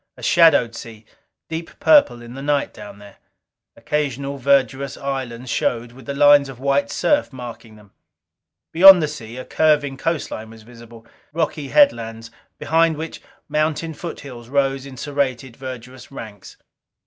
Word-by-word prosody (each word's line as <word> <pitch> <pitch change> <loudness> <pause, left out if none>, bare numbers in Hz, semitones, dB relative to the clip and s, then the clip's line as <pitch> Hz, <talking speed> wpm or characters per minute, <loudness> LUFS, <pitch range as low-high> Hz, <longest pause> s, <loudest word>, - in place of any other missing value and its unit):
A - - -13
shadowed 145 -9 +4
sea, 110 -1 -10 0.4
deep 165 +1 -7
purple 205 - +4
in 120 +1 -11
the 135 - -8
night 145 0 -1
down 105 -1 -11
there. 100 -1 -15 0.6
Occasional 140 -2 -3
verdurous 135 0 +1
islands 130 -3 -5
showed, 120 0 -1
with 130 +3 -16
the 140 - -4
lines 145 -1 +5
of 130 -2 -10
white 140 -2 0
surf 295 - 0
marking 120 -3 -10
them. 105 -2 -19 0.8
Beyond 185 0 +8
the - - 0
sea, 120 -5 -9
a 130 - -7
curving 145 -3 +1
coastline 135 -8 -3
was 110 -1 -14
visible. 115 0 -15 0.3
Rocky 155 -3 -2
headlines, 115 - +2 0.3
behind 165 0 +1
which 160 +1 -7 0.3
mountain 155 +1 -1
foothills 135 -8 -9
rose 135 -1 0
in 130 -2 -11
serrated, 130 -3 -3
verdurous 130 -1 -10
ranks. 110 -7 -11
135 Hz, 145 wpm, -20 LUFS, 120-150 Hz, 0.8 s, Beyond